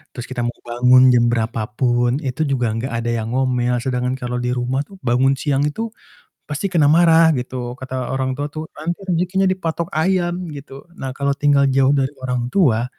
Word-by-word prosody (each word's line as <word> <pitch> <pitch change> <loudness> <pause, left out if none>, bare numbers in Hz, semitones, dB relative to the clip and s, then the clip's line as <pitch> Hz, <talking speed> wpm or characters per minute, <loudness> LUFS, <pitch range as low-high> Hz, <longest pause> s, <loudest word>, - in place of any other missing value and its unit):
terus 120 - -5
kita 125 - -5
mau 120 - -4
bangun 125 +2 +5
jam 120 -1 +4
berapa 115 -2 -1
pun 120 +2 +1
itu 140 +4 -1
juga 125 -5 0
gak 115 +4 -3 0.2
ada 120 - -1
yang 115 -1 -2
ngomel, 125 -2 +1
sedangkan 125 0 -1
kalo 125 -1 -4
di 125 +1 -1
rumah 125 +2 -1
tuh 195 - -14
bangun 130 +2 +2
siang 145 +1 0
itu, 225 +9 -4 0.5
pasti 150 +7 -3
kena 170 -5 +2
marah 165 +1 +5
gitu 125 -2 -4
kata 130 -1 -4
orang 130 -1 -1
tua 145 +1 -2
tuh, 155 0 -6
"Nanti 170 +4 -3
rejekinya 185 +2 +1
dipatok 170 -3 -2
ayam," 175 0 0
gitu. 140 -1 -10 0.2
Nah 135 0 -5
kalo 140 0 0
tinggal 140 0 +3
jauh 135 +1 +3
dari 135 0 0
orang 125 -1 -2
tua, 125 - +3
130 Hz, 190 wpm, -20 LUFS, 125-155 Hz, 0.5 s, bangun